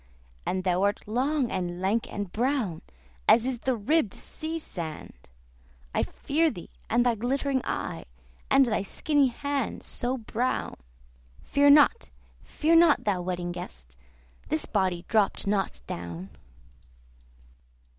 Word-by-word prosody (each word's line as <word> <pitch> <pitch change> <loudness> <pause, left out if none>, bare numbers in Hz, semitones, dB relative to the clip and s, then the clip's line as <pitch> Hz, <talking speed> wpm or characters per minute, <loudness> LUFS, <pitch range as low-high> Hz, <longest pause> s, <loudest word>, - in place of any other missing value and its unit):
And 185 0 -1
thou 180 0 +1
art 205 +1 0
long, 260 +4 0
and 175 -1 -3
lank, 200 +5 0
and 205 -3 -4
brown, 235 - 0 0.5
As 230 +1 +6
is 255 -2 -2
the 260 +1 0
ribbed 230 - +1
sea 320 +1 -5
sand. 160 - -8 0.6
"I - - +2
fear 320 +3 +1
thee 175 - -9 0.2
and 240 +1 +3
thy 245 - +4
glittering 265 +4 0
eye, - - -4 0.4
And 270 0 +6
thy 220 -4 0
skinny 285 +8 +2
hand, 280 +1 -3
so 250 +2 -2
brown." 240 +2 -2 0.7
Fear 285 0 +4
not, 295 +11 +5 0.3
fear 320 +2 +1
not, 330 -3 +6
thou 195 -4 0
Wedding 175 -1 -3
Guest! 65 - -9 0.5
This 155 - +1
body 180 -2 0
dropt 215 -4 +1
not 195 - -1
down. 85 +4 -6
225 Hz, 130 wpm, -27 LUFS, 180-275 Hz, 0.7 s, As